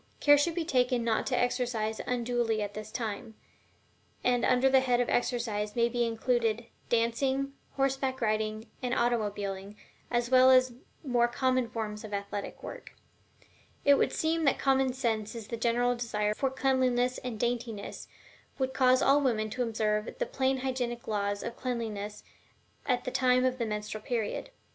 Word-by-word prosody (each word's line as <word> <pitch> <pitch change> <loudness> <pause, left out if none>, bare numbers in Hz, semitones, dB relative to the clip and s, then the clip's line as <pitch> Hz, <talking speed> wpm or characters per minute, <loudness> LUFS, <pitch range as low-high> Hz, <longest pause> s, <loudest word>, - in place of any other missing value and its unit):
Care 290 0 +7
should 315 +3 +1
be 340 -2 -1
taken 250 -4 +2
not 230 -1 0
to 250 - 0
exercise 240 -3 -1
unduly 240 -2 0
at 205 0 -5
this 215 +1 -7
time, 220 -1 -4 0.9
and 245 -1 +2
under 255 +1 +4
the 265 0 +5
head 250 -2 +1
of 245 - +1
exercise 225 -4 -1
may 235 0 +3
be 240 0 0
included 230 0 0 0.2
dancing, 265 +4 +1 0.2
horseback 270 -1 0
riding, 215 0 -1 0.2
and 250 -1 -1
automobiling, 205 -4 -1 0.3
as 240 0 0
well 255 0 +7
as 255 0 +6
the 240 0 -16 0.3
more 240 -2 +3
common 255 0 0
forms 210 -2 -4
of 210 -2 -4
athletic 200 0 -5
work. - - -9 0.9
It 285 - +7
would 280 - +2
seem 325 +1 0
that 275 - +3
common 270 -1 +2
sense 225 -4 -2
and 230 - -5
the 235 - -4
general 240 +1 +1
desire 210 -3 -1
for 270 +5 0
cleanliness 255 -2 +1
and 240 -4 -6
daintiness 235 -3 -3 0.5
would 260 -1 -1
cause 255 -1 +4
all 280 +2 +5
women 215 -5 0
to 250 - -3
observe 215 -2 -1
the - - 0
plain 265 0 0
hygienic 245 -2 -3
laws 205 -1 -1
of 235 - -5
Cleanliness 220 -5 -4 0.6
at 250 -2 +1
the 255 - -4
time 255 0 +3
of 255 0 0
the 230 - -1
menstrual 210 0 -4
period. 230 - -3
240 Hz, 165 wpm, -30 LUFS, 220-255 Hz, 0.9 s, Care